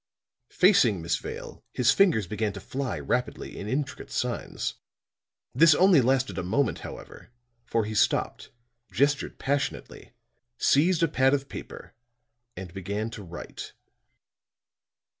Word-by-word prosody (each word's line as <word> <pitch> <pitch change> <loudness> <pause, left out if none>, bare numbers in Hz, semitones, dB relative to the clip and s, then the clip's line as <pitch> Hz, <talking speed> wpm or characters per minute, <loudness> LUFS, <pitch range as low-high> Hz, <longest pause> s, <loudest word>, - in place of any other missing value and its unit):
Facing 140 - +4
Miss 85 +1 -1
Vale, - - -8
his 125 0 +3
fingers 175 - +3
began 105 +1 -2
to 100 - -7
fly 130 +6 -4
rapidly 125 0 -3
in 100 - -6
intricate 140 +3 -3
signs. - - -3 0.8
This 160 +4 +6
only 185 -5 +6
lasted 130 +1 +1
a - - -3
moment, 115 +8 0
however; - - -10 0.4
for 115 -2 0
he 110 - -5
stopped, 105 - 0 0.4
gestured 140 +1 +1
passionately, 140 +1 -3 0.4
seized 165 +7 +3
a - - +5
pad 135 -2 +3
of 135 -1 -4
paper - - -9 0.6
and 90 -2 -8
began 100 +4 -4
to 115 - -8
write. 85 -2 -9
125 Hz, 125 wpm, -27 LUFS, 105-145 Hz, 0.8 s, This